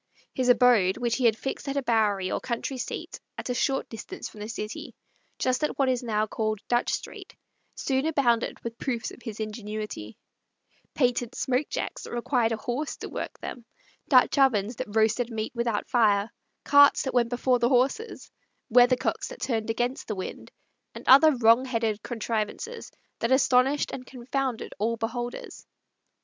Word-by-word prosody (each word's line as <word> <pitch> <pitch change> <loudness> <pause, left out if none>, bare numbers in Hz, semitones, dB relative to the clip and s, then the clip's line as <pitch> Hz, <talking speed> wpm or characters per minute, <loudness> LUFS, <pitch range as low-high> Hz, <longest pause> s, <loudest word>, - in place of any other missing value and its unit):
His 255 -1 0
abode, 240 -7 +5
which 240 -2 0
he 255 - 0
had 225 -2 +4
fixed 270 +3 -5
at 275 - -2
a 280 - 0
Bowerie 210 -6 +1
or - - -1
country 255 +2 -4
seat - - -5 0.2
at - - -4
a - - +1
short 270 +2 0
distance 225 -1 -7
from 215 - -14
the 210 +1 -6
city, 215 0 -6 0.4
just 255 +2 0
at 300 - -1
what 275 -2 +2
is 255 -1 +1
now 215 -3 0
called 215 0 -2
Dutch 240 0 +1
Street, - - -6 0.4
soon 270 +2 0
abounded 245 -7 +1
with 230 0 -6
proofs 245 -4 -2
of - - -13
his 225 -2 -7
ingenuity: 215 - -5 0.8
patent 245 -2 +1
smoke 260 +3 0
jacks - - -4
that - - -8
required 240 -1 +1
a 225 - -1
horse 245 +7 -3
to - - -7
work - - -5
them; 245 - -7 0.5
Dutch 260 +1 +5
ovens 230 -4 +2
that 210 - -6
roasted 220 +2 +2
meat 220 -1 -3
without 235 -3 -1
fire; 210 -3 +2 0.3
carts 285 0 +6
that 265 - -3
went 235 -2 +2
before 245 +1 +1
the 240 - +2
horses; 270 - 0 0.4
weathercocks 245 +2 +3
that - - -10
turned 225 -3 -2
against 240 +3 -2
the 215 - -3
wind; 185 - -7 0.4
and - - -10
other 290 +3 +8
wrong 235 +1 +5
headed 225 -4 -1
contrivances 230 - -4 0.3
that 230 - -1
astonished 265 +1 +3
and 255 - -6
confounded 260 -1 -3
all 230 +3 0
beholders. 240 +2 -5
240 Hz, 170 wpm, -27 LUFS, 220-260 Hz, 0.8 s, other